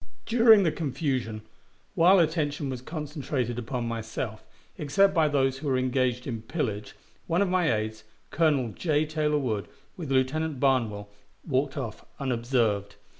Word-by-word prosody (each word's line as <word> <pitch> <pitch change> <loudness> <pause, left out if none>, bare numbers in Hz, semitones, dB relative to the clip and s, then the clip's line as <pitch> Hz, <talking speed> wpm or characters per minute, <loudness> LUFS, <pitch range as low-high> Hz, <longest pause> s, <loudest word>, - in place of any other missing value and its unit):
During 225 -3 +6
the 165 - +2
confusion, 130 -8 -2 0.5
while 180 +4 +6
attention 150 -4 0
was 125 -2 -5
concentrated 140 -5 -3
upon 120 0 -3
myself, 115 -1 -4 0.4
except 195 +7 +3
by 160 -4 +3
those 135 -2 +1
who 150 - -5
were 130 -2 +2
engaged 130 -1 0
in 115 -5 -4
pillage, 110 -5 -3 0.3
one 170 - +1
of 195 - -1
my 180 -5 +2
aides, 110 0 -2 0.3
Colonel 145 -7 +2
J. 155 - 0
Taylor 150 -1 0
Wood, 110 -9 -2 0.3
with 165 -6 -6
Lieutenant 135 +3 0
Barnwell, 115 -7 +1 0.4
walked 140 0 0
off 115 -6 -5 0.2
unobserved. 115 -6 0
135 Hz, 140 wpm, -27 LUFS, 120-155 Hz, 0.5 s, During